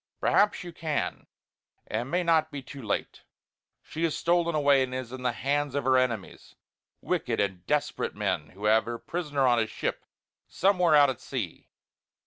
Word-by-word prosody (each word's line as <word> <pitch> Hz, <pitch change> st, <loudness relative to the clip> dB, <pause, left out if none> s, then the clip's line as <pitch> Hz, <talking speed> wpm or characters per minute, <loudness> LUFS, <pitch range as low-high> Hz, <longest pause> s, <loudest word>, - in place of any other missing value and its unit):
Perhaps 205 Hz, -2 st, +3 dB
you 175 Hz, -1 st, -8 dB
can, 160 Hz, -3 st, -3 dB, 0.6 s
and -, -, -2 dB
it -, -, -5 dB
may 175 Hz, +7 st, 0 dB
not 160 Hz, -2 st, +3 dB
be 145 Hz, -3 st, -7 dB
too 140 Hz, +2 st, -10 dB
late. 105 Hz, -4 st, -3 dB, 0.6 s
She 160 Hz, -, -5 dB
is 165 Hz, -2 st, +1 dB
stolen 170 Hz, -1 st, +1 dB
away 140 Hz, -2 st, +4 dB
and 130 Hz, -1 st, -2 dB
is 130 Hz, -2 st, -5 dB
in 130 Hz, 0 st, -7 dB
the 125 Hz, -1 st, +1 dB
hands 145 Hz, +3 st, -1 dB
of 140 Hz, -, 0 dB
her 130 Hz, 0 st, +3 dB
enemies; 120 Hz, -6 st, -1 dB, 0.5 s
wicked -, -, -1 dB
and 95 Hz, -3 st, -1 dB
desperate 150 Hz, 0 st, -1 dB
men 75 Hz, -, -2 dB
who 100 Hz, +3 st, -7 dB
have 110 Hz, +1 st, +4 dB
her 120 Hz, 0 st, -4 dB
prisoner 150 Hz, -2 st, -2 dB
on 120 Hz, -2 st, +4 dB
a 110 Hz, -, +1 dB
ship -, -, -3 dB, 0.4 s
somewhere 180 Hz, -4 st, +3 dB
out 145 Hz, -2 st, +6 dB
at 130 Hz, -, -9 dB
sea. 115 Hz, -11 st, -5 dB
140 Hz, 180 wpm, -28 LUFS, 120-160 Hz, 0.6 s, out